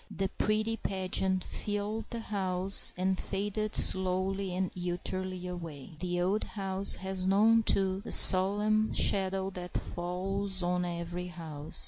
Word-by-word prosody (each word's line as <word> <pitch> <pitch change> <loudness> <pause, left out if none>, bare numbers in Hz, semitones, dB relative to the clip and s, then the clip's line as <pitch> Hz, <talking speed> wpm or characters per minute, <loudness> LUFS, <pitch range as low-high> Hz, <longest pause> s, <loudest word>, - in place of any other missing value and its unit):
The 195 0 -3
pretty 215 +3 -1
pageant 190 -2 -1
filled 210 +2 -3
the 235 -1 -5
house, 190 -2 +3
and 185 +1 -1
faded 205 +2 -3
slowly 190 +1 0
and 185 -1 -2
utterly 180 +1 -4
away. 165 -5 -8
The 175 0 -2
old 190 +4 0
house 195 -1 +2
has 190 -1 -2
known, 220 +4 +4
too, 190 -3 +3
the - - -7
solemn 210 +3 +5
shadow 190 0 +1
that 180 -1 -6
falls 190 +2 -4
on 180 0 -1
every 175 +1 -5
house. 160 -4 -2
190 Hz, 130 wpm, -30 LUFS, 180-200 Hz, -, solemn